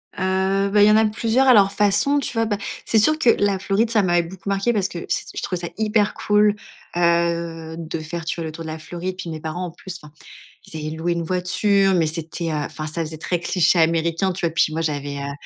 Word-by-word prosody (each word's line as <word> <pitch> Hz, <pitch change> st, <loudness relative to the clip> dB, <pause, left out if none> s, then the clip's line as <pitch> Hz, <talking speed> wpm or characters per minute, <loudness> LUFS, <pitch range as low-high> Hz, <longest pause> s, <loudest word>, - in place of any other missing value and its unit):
Heu, 190 Hz, +1 st, 0 dB
ben, 210 Hz, 0 st, +4 dB
il 205 Hz, -, +7 dB
y -, -, +6 dB
en -, -, +5 dB
a 220 Hz, -, +4 dB
plusieurs 230 Hz, +5 st, +1 dB
à 255 Hz, -, +8 dB
leur 200 Hz, -2 st, +5 dB
façon, 210 Hz, +9 st, +2 dB
tu 265 Hz, -, -4 dB
vois? 225 Hz, 0 st, +1 dB
Ben, 205 Hz, -2 st, -1 dB, 0.3 s
c'est 225 Hz, -, +2 dB
sûr 310 Hz, +8 st, +3 dB
que 245 Hz, -, +4 dB
la 200 Hz, -3 st, +2 dB
Floride, 205 Hz, +4 st, +1 dB
ça 215 Hz, -3 st, +3 dB
m'avait 175 Hz, -1 st, +2 dB
beaucoup 190 Hz, +2 st, -8 dB
marqué 200 Hz, +5 st, +1 dB
parce 200 Hz, -3 st, +1 dB
cet 170 Hz, -, -7 dB, 0.3 s
je -, -, -3 dB
trouvais 180 Hz, -2 st, -2 dB
ça -, -, -8 dB
hyper 210 Hz, -1 st, +1 dB
cool, 210 Hz, 0 st, +2 dB, 0.4 s
heu, 170 Hz, -1 st, 0 dB
de 165 Hz, 0 st, -5 dB
faire 165 Hz, +1 st, -6 dB
tu -, -, -2 dB
vois, 165 Hz, -, -3 dB
le 155 Hz, -, -5 dB
tour 165 Hz, +1 st, -8 dB
de 160 Hz, -, -6 dB
la 160 Hz, 0 st, -6 dB
Floride. 180 Hz, +3 st, -5 dB
Puis 175 Hz, -, -6 dB
mes 160 Hz, -1 st, -5 dB
parents, 170 Hz, +3 st, -4 dB
en 170 Hz, -, -6 dB
plus 180 Hz, +1 st, -9 dB
enfin, 150 Hz, 0 st, -15 dB, 0.5 s
ils 160 Hz, -, -9 dB
avaient 155 Hz, +1 st, -5 dB
loué 170 Hz, +2 st, -1 dB
une 170 Hz, 0 st, -2 dB
voiture, 190 Hz, +3 st, +1 dB
mais 165 Hz, -3 st, +2 dB
c'était, 165 Hz, +1 st, -4 dB
heu -, -, -2 dB
enfin, 155 Hz, +1 st, -4 dB
ça 165 Hz, +2 st, -3 dB
faisait 155 Hz, 0 st, -7 dB
très 170 Hz, +2 st, -2 dB
cliché 175 Hz, -1 st, +2 dB
américain, 165 Hz, +3 st, +1 dB
tu 175 Hz, -1 st, -5 dB
vois? -, -, 0 dB
Puis 155 Hz, -1 st, +2 dB
moi, 165 Hz, +1 st, -2 dB
j'avais, 145 Hz, -2 st, -3 dB
heu, 140 Hz, 0 st, -4 dB
175 Hz, 250 wpm, -21 LUFS, 160-205 Hz, 0.5 s, à